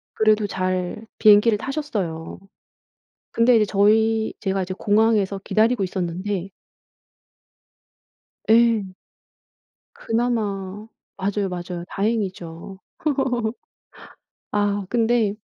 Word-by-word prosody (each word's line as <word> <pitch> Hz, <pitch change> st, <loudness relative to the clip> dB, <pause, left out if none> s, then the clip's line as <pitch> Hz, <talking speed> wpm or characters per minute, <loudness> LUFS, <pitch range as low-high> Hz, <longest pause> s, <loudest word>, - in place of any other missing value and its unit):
그래도 215 Hz, -1 st, +3 dB
잘 185 Hz, +2 st, -3 dB
비행기를 210 Hz, 0 st, +6 dB
타셨어요. 205 Hz, -, -4 dB, 0.9 s
근데 235 Hz, +1 st, +4 dB
이제 215 Hz, -, +3 dB
저희 220 Hz, +2 st, +2 dB
제가 195 Hz, -2 st, -1 dB
이제 185 Hz, +1 st, -5 dB
공항에서 210 Hz, -2 st, +2 dB
기다리고 220 Hz, 0 st, +2 dB
있었는데 185 Hz, +1 st, -3 dB, 2.0 s
예. 225 Hz, -4 st, +3 dB, 1.0 s
그나마 210 Hz, -4 st, -2 dB, 0.3 s
맞아요, 200 Hz, 0 st, -1 dB
맞아요. 175 Hz, -1 st, -6 dB
다행이죠. 190 Hz, -4 st, -3 dB, 1.7 s
아 205 Hz, -1 st, 0 dB
근데 230 Hz, -3 st, +2 dB
205 Hz, 200 characters per minute, -22 LUFS, 190-225 Hz, 2.0 s, 비행기를